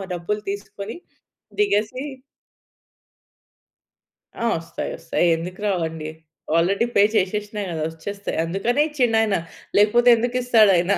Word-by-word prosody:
డబ్బులు 190 +5 -3
తీసుకొని 200 +1 -7 0.7
దిగేసి 255 - +1 2.3
ఆ! - - -3
వస్తాయి. 165 +1 -5
వస్తాయి. - - 0
ఎందుకు 180 +4 -7
రావండి? 160 -4 -2 0.5
ఆల్రెడీ 195 +7 +2
పే 200 - +6
చేసేసినా 210 +1 -1
కదా! 160 -2 -3
వచ్చేస్తాయి. 200 +5 -5
అందుకనే 195 - +1
ఇచ్చిండాయన. 225 -8 +2 0.4
లేకపోతే 225 +4 +5
ఎందుకిస్తాడాయన 225 -6 +3
205 Hz, 95 wpm, -22 LUFS, 175-225 Hz, 2.3 s, పే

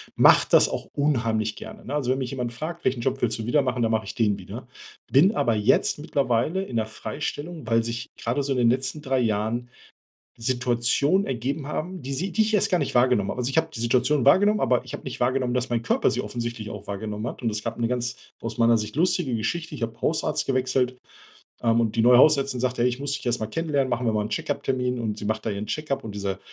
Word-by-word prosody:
mach - - +6
das - - +5
auch - - -4
unheimlich 115 -7 0
gerne. 135 - -8
Also, 140 -4 0
wenn 130 - +1
mich 130 -2 -3
jemand 125 -3 -3
fragt: 170 +7 -6
„Welchen 125 -2 +1
Job 135 +2 -1
willst 115 -3 0
du 110 - -4
wieder 135 +5 +3
machen,“ 130 -2 -1
dann 115 - +1
mache 110 -1 0
ich 110 - -7
den 105 -5 +1
wieder. - - -9 0.4
Bin 180 +11 +5
aber 115 -2 +2
jetzt 105 +6 +2
mittlerweile 145 +4 0
in 125 -11 -4
der 110 - +1
Freistellung, 145 +7 -5
weil 115 0 +3
sich 115 +1 -4
grade 120 +5 -1
so 140 0 -1
in - - -2
den 120 -2 +4
letzten 130 +4 -1
3 135 -2 0
Jahren 115 +1 -1 0.7
Situationen 125 +8 +1
ergeben 135 +3 -3
haben, 175 +4 -4
die 135 +2 -5
sie 180 +8 -2
die 220 - +2
ich 220 0 +1
erst 210 - +2
gar 180 - +3
nicht - - -2
wahrgenommen 120 -5 +3
habe. - - -4
Also, 125 0 -1
ich 135 - -3
habe 160 0 +2
die 115 - -5
Situation 125 +4 +2
wahrgenommen, 205 +9 +5
aber 125 -1 +2
ich 130 - -9
habe - - -6
nicht 130 - -6
wahrgenommen, 125 0 +1
dass 125 0 -1
mein 120 -1 0
Körper 120 - +2
sie - - -1
offensichtlich 115 -3 -5
auch 105 -1 -8
wahrgenommen 105 +2 -4
hat. - - -7
Und 115 - +2
es 105 0 -3
gab - - -4
'ne 120 -1 0
ganz, 125 0 -2 0.3
aus 115 -1 -5
meiner 115 0 +5
Sicht, 105 +1 -5
lustige 165 -5 +1
Geschichte. 155 +8 -3
Ich 130 - -10
habe 115 0 -5
Hausarzt 160 - 0
gewechselt, 130 -1 0 0.6
ähm, 115 0 +3
und 110 -2 -1
die 115 - +3
neue 120 +2 +7
Hausärztin 140 -2 +4
sagt: 125 0 -1
„Ja, 120 - +3
ich 125 0 +1
muss 140 0 -3
dich - - -5
erst 120 -1 0
mal - - 0
kennenlernen. 145 +1 -1
Machen 125 0 -1
wir 110 - +2
mal 105 - +1
einen 105 - -4
Check-up-Termin.“ 130 -5 -1
Und 110 -3 -3
sie - - -6
macht 110 +1 -2
da 110 - 0
ihren 100 +1 -4
Check-up. 150 +2 -3
Und 105 -2 -7
diese 100 -1 -3
125 Hz, 245 wpm, -25 LUFS, 115-140 Hz, 0.7 s, neue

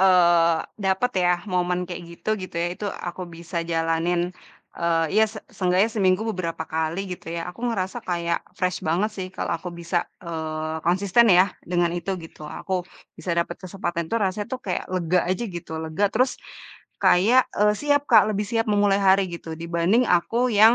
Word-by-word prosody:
eee, 175 -3 +5 0.3
dapet 190 +6 +2
ya, 180 0 +4 0.2
momen 180 0 0
kayak 175 0 -6 0.2
gitu, - - -8
gitu 185 - -8
ya, - - +1
itu 205 - -5
aku 175 +1 -6
bisa 170 +1 -8
jalanin 170 +2 0 0.4
e 170 - -6 0.4
iya 220 - +4
se 215 - -11 0.2
seenggaknya 185 +1 +2
seminggu 195 0 +2
beberapa 165 -3 -3
kali 160 +2 -2
gitu 175 - -9
ya, - - -2
aku 230 - -15
ngerasa 190 -5 -2
kayak 170 -1 0 0.2
fresh 180 -1 0
banget 180 +7 0
sih, 185 -2 -3
kalau - - -2
aku 180 - -7
bisa, 170 +1 -2 0.3
eee, 160 -1 -3
konsisten 195 +6 +4
ya 180 -1 +7 0.3
dengan 175 -1 +2
itu 175 +2 -3
gitu. 160 - -15
Aku 190 - -6 0.4
bisa 180 - -5
dapet 170 0 -1
kesempatan 175 -2 -3
tuh - - +1
rasanya 200 +2 -2
tuh, 260 - -3
kaya 185 - -1
lega 180 0 +1
aja 185 +6 0
gitu 165 - -8
lega, 160 +6 -1
terus 255 +3 +2 0.7
kayak 220 +9 +6 0.2
e - - +5
siap 290 +2 +2
Kak. 220 -3 +8
Lebih 210 +1 -1
siap 225 -1 +1
memulai 205 -1 +3
hari 195 0 +4
gitu, 170 -2 -7
dibanding 170 +8 +2
aku 230 +9 +2
yang 225 +3 +8
180 Hz, 175 wpm, -24 LUFS, 170-200 Hz, 0.7 s, Kak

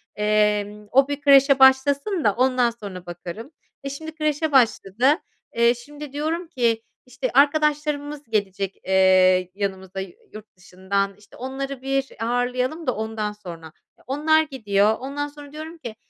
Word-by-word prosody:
emm, 210 0 0
o 270 +1 +5
bir 285 0 -4
kreşe 275 -1 +6
başlasın 280 +7 +4
da 205 - +3
ondan 255 0 +2
sonra 200 -6 -9
bakarım. 175 - -8 0.3
E, 275 - -4
şimdi 315 +3 -8
kreşe 305 0 -1
başladı. 235 -4 +2 0.5
Eee, 235 +1 +4
şimdi, 290 +3 -11
diyorum 320 +4 -2
ki, 235 -7 0 0.2
işte, 255 0 -4
arkadaşlarımız 295 +1 +1
gelecek, 195 -2 -2
eee, 185 -1 +4
yanımıza 190 -1 -4
yu 190 - -7 0.2
yurt 215 0 -12
dışından, 195 +2 -3
işte, 210 0 -19
onları 270 +1 -5
bir 270 0 -1 0.2
ağırlayalım 250 +6 -1
da 255 - +1
ondan 220 -1 -3
sonra. 175 -6 -10 0.3
Eee, - - -25
onlar 305 +4 +3
gidiyor, 215 -7 +1
ondan 280 +3 -4
sonra 290 -1 -13
diyorum 315 +2 -8
ki, 235 -8 -8
250 Hz, 145 wpm, -23 LUFS, 205-285 Hz, 0.5 s, kreşe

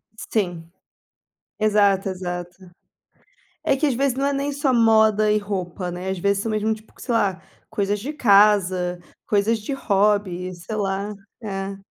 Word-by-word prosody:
Sim. 175 -7 -3 0.9
Exato, 205 -2 +3
exato. 175 -1 -5 1.1
É 275 - +3
que 300 +3 +1
às 275 - +1
vezes 270 +1 +1
não 275 +1 0
é 285 - +1
nem 280 +1 -1
só 280 -1 +1
moda 220 -2 +4
e 210 - +3
roupa, 185 -3 -4
né. 180 +2 -4
Às 190 - -3
vezes 200 +2 +1
são 225 - -2
mesmo 215 +1 0
tipo 215 0 -17
sei 245 - -2
lá, 195 -5 +1 0.3
coisas 205 -1 -1
de 275 +8 -4
casa, 195 -7 +4 0.3
coisas 215 +2 +2
de 215 +6 -5
hobby, 200 -6 +1
sei 175 +5 -6
lá, 200 0 -2 0.3
é. 195 -2 -4
205 Hz, 155 wpm, -22 LUFS, 190-220 Hz, 1.1 s, moda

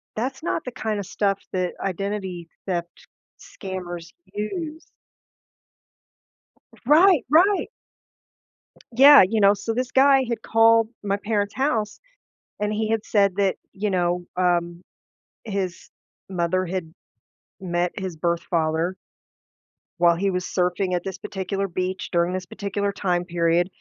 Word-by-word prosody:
that's 260 +5 -3
not 330 0 -2
the 250 - -6
kinda 215 -4 -3
stuff 195 +1 -1
that 180 -1 -1
identity 190 -2 -4 0.2
theft 175 -2 -2 0.5
scammers 175 -3 -7 0.3
use. 305 - -4 2.0
Right, 325 +2 +6
right! 375 +7 +4 1.3
Yeah, 280 +3 +9
you 220 +2 0
know, 200 0 +6
so 225 +3 -3
this 255 +1 -2
guy 270 0 +5
had 235 -1 -3
called 225 0 +4
my 200 0 0
parents' 205 -1 -1
house 225 -6 -1 0.6
and 210 0 0
he 215 0 -1
had 225 -1 0
said 200 -3 +2
that 200 -2 +1 0.2
you 205 +1 -2
know, 175 -1 0
um, 175 -1 0 0.6
his 195 -4 -4 0.4
mother 185 0 0
had 170 -2 -4 0.7
met 175 -1 -1
his 185 -3 -5
birth 170 +1 -1
father 165 +2 0 1.0
while 170 -1 +5
he 195 +3 0
was 180 -1 -2
surfing 180 +1 0
at 175 - -1
this 190 -1 -5
particular 195 0 -3
beach 185 +2 -3
during 170 0 +1
this 185 0 -4
particular 200 +2 -3
time 180 -3 -1
period, 170 0 +1
195 Hz, 130 wpm, -23 LUFS, 175-215 Hz, 2.0 s, Yeah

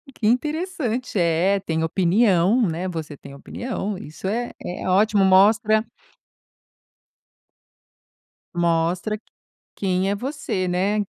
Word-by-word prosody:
Que 215 - -4
interessante. 255 - -1
É, 175 +4 +2
tem 160 -4 -2
opinião, 190 +5 +3
né. 175 +2 -2
Você 160 -5 -6
tem 140 - -12
opinião, 210 - -5
isso 155 +4 -8
é 240 +4 -2
é 180 - -5
ótimo 200 +1 +3
mostra 215 +3 +4 2.7
Mostra 175 +5 0
q - - -30 0.6
quem 190 0 0
é 200 - 0
você, 245 -6 -3
né, 195 +4 +1
195 Hz, 110 wpm, -22 LUFS, 175-220 Hz, 2.7 s, mostra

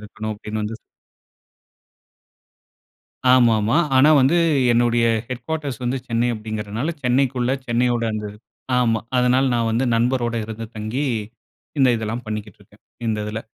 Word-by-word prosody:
இருக்கணும், 110 +1 -6
அப்படின்னு 105 +1 -5
வந்து 110 +1 -4 2.5
ஆமாமா. 115 -1 +4 0.2
ஆனா, 145 +4 +6
வந்து 140 +7 +3 0.4
என்னுடைய 120 0 +3 0.2
ஹெட் 125 -1 -5
குவார்ட்டர்ஸ் 150 -7 -3
வந்து, 125 +2 0
சென்னை 115 +1 +1
அப்படிங்கிறனால, 110 +6 -4
சென்னைக்குள்ள, 125 0 +1 0.2
சென்னையோட 120 0 +1
அந்த 105 -1 -4 0.5
ஆமா. 115 -3 +2 0.2
அதனால, 125 +2 +3
நான் 115 -1 +1
வந்து 120 +4 +1
நண்பரோட 120 0 +1
இருந்து 110 +1 -6
தங்கி, 110 +7 -2 0.7
இந்த 130 -2 +5
இதெல்லாம் 110 +2 -4
பண்ணிக்கிட்டு 105 -2 -6
இருக்கேன், 105 +2 -22 0.2
இந்த 110 -1 0
இதுல. 105 +1 -4
115 Hz, 125 wpm, -21 LUFS, 110-125 Hz, 2.5 s, ஆனா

